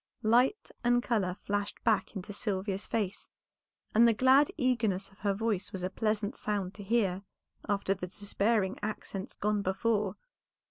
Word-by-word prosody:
Light 245 Hz, -, +3 dB
and 245 Hz, 0 st, +3 dB
color 200 Hz, -8 st, 0 dB
flashed 205 Hz, 0 st, -2 dB
back 220 Hz, -1 st, +1 dB
into 200 Hz, +1 st, -6 dB
Sylvia's 195 Hz, -2 st, -2 dB
face, 205 Hz, -3 st, -2 dB, 0.6 s
and 230 Hz, +2 st, +7 dB
the 230 Hz, -, +4 dB
glad 265 Hz, +4 st, +5 dB
eagerness 230 Hz, -, +1 dB
of 195 Hz, -, -23 dB
her 200 Hz, -1 st, 0 dB
voice 210 Hz, -3 st, -1 dB
was 190 Hz, -3 st, -5 dB
a 185 Hz, -, -1 dB
pleasant 215 Hz, +2 st, -1 dB
sound 200 Hz, -3 st, -2 dB
to 205 Hz, -, -9 dB
hear 195 Hz, -3 st, +1 dB, 0.5 s
after 200 Hz, -1 st, +1 dB
the 185 Hz, -2 st, -6 dB
despairing 205 Hz, +1 st, 0 dB
accents 205 Hz, 0 st, -5 dB
gone 210 Hz, 0 st, 0 dB
before. 200 Hz, +1 st, 0 dB
205 Hz, 150 wpm, -31 LUFS, 195-230 Hz, 0.6 s, and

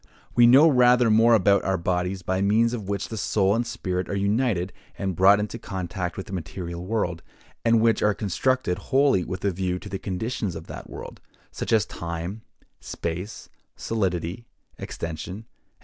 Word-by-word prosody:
We 120 Hz, -1 st, +6 dB
know 135 Hz, +6 st, +8 dB
rather 125 Hz, -4 st, +5 dB
more 115 Hz, +2 st, +6 dB
about 100 Hz, -1 st, +3 dB
our 95 Hz, 0 st, 0 dB
bodies, 90 Hz, +2 st, -2 dB
by 95 Hz, +1 st, -1 dB
means 110 Hz, +4 st, +3 dB
of 105 Hz, -5 st, -5 dB
which 100 Hz, -1 st, -2 dB
the 110 Hz, -, -5 dB
soul 100 Hz, 0 st, +2 dB
and 115 Hz, +2 st, 0 dB
spirit 90 Hz, -5 st, -3 dB
are -, -, -2 dB
united 100 Hz, -2 st, 0 dB, 0.2 s
and 95 Hz, -2 st, -2 dB
brought 100 Hz, +4 st, +6 dB
into 105 Hz, +3 st, -4 dB
contact 95 Hz, -3 st, -4 dB
with 95 Hz, -, -5 dB
the -, -, -9 dB
material 85 Hz, 0 st, -5 dB
world, 90 Hz, -4 st, -2 dB, 0.4 s
and 115 Hz, -1 st, +4 dB
which 115 Hz, 0 st, +3 dB
are 105 Hz, -1 st, +2 dB
constructed 105 Hz, -1 st, 0 dB
wholly 135 Hz, -3 st, +2 dB
with 90 Hz, +2 st, -5 dB
a 100 Hz, -, +2 dB
view 90 Hz, 0 st, -2 dB
to 100 Hz, -, -10 dB
the 95 Hz, -1 st, -4 dB
conditions 100 Hz, 0 st, -3 dB
of -, -, -7 dB
that -, -, -9 dB
world; -, -, -9 dB, 0.3 s
such -, -, -5 dB
as 110 Hz, -4 st, +4 dB
time, 85 Hz, +5 st, -5 dB, 0.4 s
space, 90 Hz, +5 st, -5 dB, 0.3 s
solidity, 95 Hz, 0 st, -2 dB, 0.3 s
extension, 85 Hz, +5 st, -6 dB
&c. 115 Hz, -, -29 dB
100 Hz, 175 wpm, -25 LUFS, 90-115 Hz, 0.4 s, know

